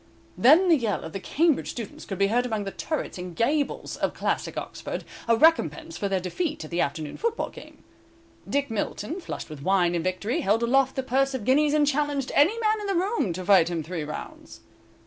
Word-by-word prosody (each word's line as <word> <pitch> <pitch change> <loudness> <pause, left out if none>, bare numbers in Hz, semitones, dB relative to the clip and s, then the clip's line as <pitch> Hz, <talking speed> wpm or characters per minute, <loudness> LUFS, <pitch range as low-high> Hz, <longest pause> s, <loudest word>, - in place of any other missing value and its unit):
Then 315 +9 +6
the 335 -3 +6
yell 225 -6 -1
of 160 - -8
the 195 - -3
Cambridge 315 - +1
students 230 -4 -7
could 195 - -5
be 200 - +3
heard 235 +5 +2
among 220 -3 -2
the 195 - -5
turrets 310 - -4
and 180 -1 -7
gables 285 - -1
of - - -1
classic - - -2
Oxford, - - -5 0.2
a 230 -1 +4
recompense 325 +2 +3
for 200 - -2
their 190 -1 +1
defeat 285 - -3
at - - -12
the 170 - 0
afternoon 145 +1 -3
football 460 0 -1
game. - - -14 0.7
Dick 280 -3 0
Milton, 225 - -3
flushed - - -6
with 150 -2 -8
wine 180 +1 +2
and 170 -2 -1
victory, 210 - -1
held 225 -1 +2
aloft 265 +2 +2
the 265 - -1
purse 270 +1 +1
of 230 -6 -5
guineas, 295 +3 +3
and 300 -1 +4
challenged 290 -1 0
any 340 +11 +4
man 430 -1 +1
in 410 - -4
the 395 - 0
room 390 - 0
to 185 +2 -6
fight 185 -4 +5
him 170 -2 -2
three 165 0 -4
rounds. 150 +1 -8
245 Hz, 210 wpm, -26 LUFS, 190-305 Hz, 0.7 s, Then